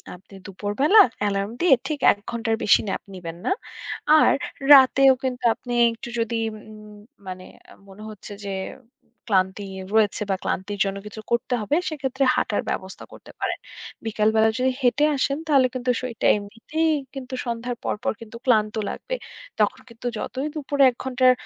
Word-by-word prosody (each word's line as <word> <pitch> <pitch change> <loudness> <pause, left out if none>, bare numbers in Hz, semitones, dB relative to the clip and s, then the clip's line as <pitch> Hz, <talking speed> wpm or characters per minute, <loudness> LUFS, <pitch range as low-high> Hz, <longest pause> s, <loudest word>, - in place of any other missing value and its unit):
আপনি 190 +2 -19
দুপুরবেলা 210 - +2 0.2
অ্যালার্ম 200 0 -1
দিয়ে 345 -6 +6
ঠিক 300 -2 -3
১ - - -3
ঘণ্টার 225 -1 -1
বেশি 210 - +5
nap - - -2
নিবেন 170 -2 -7
না। - - +1 0.7
আর - - +5 0.4
রাতেও 270 0 +7
কিন্তু 255 -1 -3
আপনি 245 -1 -7 0.2
একটু 235 +1 -9
যদি 230 0 -1 0.2
উম 215 0 -13 0.3
মানে 185 0 -7 0.4
মনে 200 +2 -12
হচ্ছে 210 0 -10
যে 195 - -3 0.8
ক্লান্তি 190 +1 +1 0.3
রয়েছে 215 -2 +2
বা 190 - +2
ক্লান্তির 200 +2 -3
জন্য 195 0 -3
কিছু 210 +1 -8
করতে 235 +1 0
হবে 250 +8 0
সেক্ষেত্রে 270 -3 -2
হাঁটার 205 - 0
ব্যবস্থা 190 0 -5
করতে - - -13
পারেন। - - -2 0.5
বিকালবেলা 220 0 +2
যদি 260 +1 +2
হেঁটে 275 +4 +3
আসেন 275 +2 0
তাহলে 270 -4 +4
কিন্তু 255 0 -3
শরীরটা 250 -3 -2
এমনিতেই 230 +11 -2 0.2
কিন্তু 265 -2 -8
সন্ধ্যার 240 +1 -3
পরপর 240 +6 -1
কিন্তু 230 0 -10
ক্লান্ত 215 -4 +2
লাগবে। - - -5 0.4
তখন 210 +4 +2
কিন্তু 230 +1 -7
যতই 270 +6 -4
দুপুরে 285 -1 +1
১ - - -21
ঘণ্টার 255 -1 +4
230 Hz, 155 wpm, -23 LUFS, 205-260 Hz, 0.8 s, রাতেও